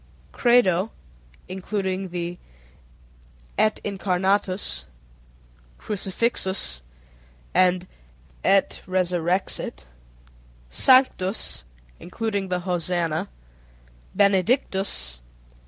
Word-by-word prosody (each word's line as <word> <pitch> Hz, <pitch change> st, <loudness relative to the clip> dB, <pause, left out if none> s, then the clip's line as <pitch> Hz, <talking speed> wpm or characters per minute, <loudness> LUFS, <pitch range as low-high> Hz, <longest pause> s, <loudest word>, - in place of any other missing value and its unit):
Credo 220 Hz, -5 st, +3 dB, 0.6 s
(including 190 Hz, 0 st, -3 dB
the 175 Hz, 0 st, -4 dB, 1.2 s
Et 215 Hz, 0 st, +2 dB
Incarnatus, 190 Hz, -, 0 dB, 0.9 s
Crucifixus, 190 Hz, -, -1 dB, 0.7 s
and 185 Hz, 0 st, +3 dB, 0.6 s
Et 195 Hz, 0 st, +3 dB
Resurrexit). 180 Hz, -, 0 dB, 0.9 s
Sanctus 225 Hz, -, +3 dB, 0.3 s
(including 200 Hz, +1 st, -3 dB
the 180 Hz, -1 st, -1 dB
Hosanna). 175 Hz, -3 st, -1 dB, 0.9 s
_Benedictus. 195 Hz, -, +2 dB
185 Hz, 55 wpm, -24 LUFS, 180-200 Hz, 1.2 s, Credo